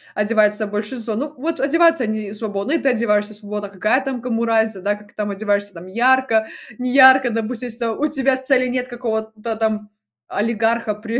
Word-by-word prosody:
одевается 210 0 +2
большинство? 215 +2 -3
Ну 285 +6 -4
вот 325 +6 -3
одеваются 330 +1 +3
они 215 -2 -3
свободно, 210 +3 -3
и - - +4
ты 275 - +1
одеваешься 215 -3 +1
свободно. 205 -1 -5
Какая 215 +7 +1
там 265 -3 -4
кому 235 -1 -1
разница, 220 -3 +1
да? 205 +2 0
Как 210 0 -16
ты - - -24
там 210 -1 -3
одеваешься 205 0 -1
там 170 +1 -11
ярко, 235 +1 +2 0.3
неярко, 260 0 +6
допустим, 230 +2 -3
если 235 0 -4
там 230 -2 -2
у 300 - +2
тебя 270 -3 +1
цели 260 -1 +2
нет 250 0 -2
какого-то 220 -2 -4
там 215 -1 -2 0.4
олигарха 225 +1 0
при 225 +3 -4
225 Hz, 180 wpm, -20 LUFS, 210-255 Hz, 0.4 s, неярко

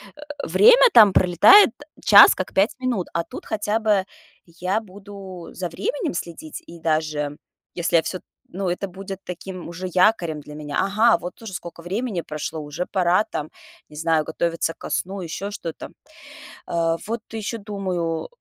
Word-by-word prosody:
э, 295 - -14 0.2
время 485 +3 +6
там 210 -4 +8
пролетает- 185 - +7 0.3
час 205 -1 +9
как 185 - -5
5 195 +4 +2
минут, 245 -8 -2
а 170 - 0
тут - - -10
хотя 215 0 -1
бы 210 -3 +2 0.4
я 180 +4 -2
буду 195 -3 -11
за 180 -2 -4
временем 405 - -3
следить. 170 -2 -7
И 170 - -11
даже 155 -2 -1 0.4
если 175 -1 -1
я 165 - +6
всё 185 +3 -4
т - - -31 0.3
ну, 190 +1 -3
это 180 +3 -2
будет 195 +1 -8
таким 180 0 -8
уже 175 +2 -7
якорем 180 -5 +2
для 150 +1 -11
меня. 150 -1 -4
Ага, 215 +4 +3
вот 175 - -8
уже 225 -4 -9
скока 170 -2 -8
времени 200 +1 -3
прошло, 155 0 -5
уже 150 +4 -5
пора 180 +1 +3
там, 150 +1 -5 0.4
не 150 - -14
знаю, 160 0 +1
готовиться 165 0 -1
ко - - -9
сну, 190 +2 -2
еще 190 +4 -5
что-то. 170 -5 -7 0.8
Э, 165 -1 0
вот 225 +1 -3
еще 225 +1 -4
думаю, 185 -5 -3
э, - - -8
185 Hz, 170 wpm, -22 LUFS, 165-205 Hz, 0.8 s, час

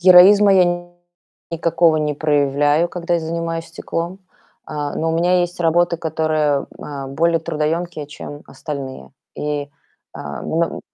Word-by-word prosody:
Героизма 190 +3 +8
я 175 -1 +2 0.6
никакого 165 -1 +2
не 150 -1 0
проявляю, 145 +2 +2
когда 175 0 -2
я 170 - +1
занимаюсь 165 0 -3
стеклом. 170 +2 -4 0.5
А, 150 -1 -4
но 160 0 -1
у - - 0
меня 180 +2 +3
есть 175 0 -2
работы, 170 +1 +2
которые, 155 -3 0
а, 140 -2 -6
более 165 +4 +2
трудоемкие, 155 0 -2
чем 145 0 -9
остальные. 140 -4 -7 0.2
И, 145 -1 -3 0.4
а, 70 -2 -7
м 165 +1 -1
165 Hz, 130 wpm, -20 LUFS, 150-175 Hz, 0.6 s, Героизма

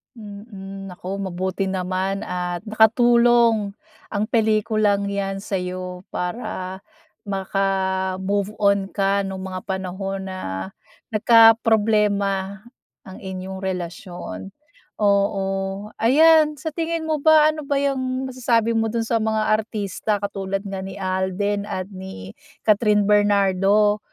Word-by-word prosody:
Mhm, 200 -3 -9
naku 185 +1 -6
mabuti 190 0 -2
naman 190 +1 -2
at 180 0 -3
nakatulong 230 -1 +4 0.3
ang 205 -1 -2
pelikulang 215 -2 +2
'yan 195 -1 -3
sa'yo 180 -1 -4
para 185 -1 -4 0.5
maka-move 195 +1 -1
on 200 -1 +2
ka 195 0 +1
no'ng 190 -1 -6
mga 185 -1 -5
panahon 190 +1 -4
na 95 - -5 0.4
nagkaproblema 210 -3 +3 0.4
ang 190 - -11
inyong 190 0 -6
relasyon. 185 +1 -6 0.4
Oo, 200 0 0
ayan, 305 +5 +5
sa 305 +3 -5
tingin 330 +1 -2
mo 315 -1 -1
ba, 310 +1 +6
ano 305 -2 -8
ba 285 - 0
yung 265 -2 -1
masasabi 235 -3 +1
mo 225 -1 +1
do'n 230 +1 -1
sa 225 0 0
mga 220 -1 0
artista 215 -1 -1
katulad 195 -1 -3
nga 195 -2 -5
ni 190 0 -7
Alden 190 +2 -1
at 185 +2 -5
ni 185 - -9 0.3
Kathryn 210 -1 +3
Bernardo, 205 0 +3
200 Hz, 110 wpm, -22 LUFS, 190-220 Hz, 0.5 s, ba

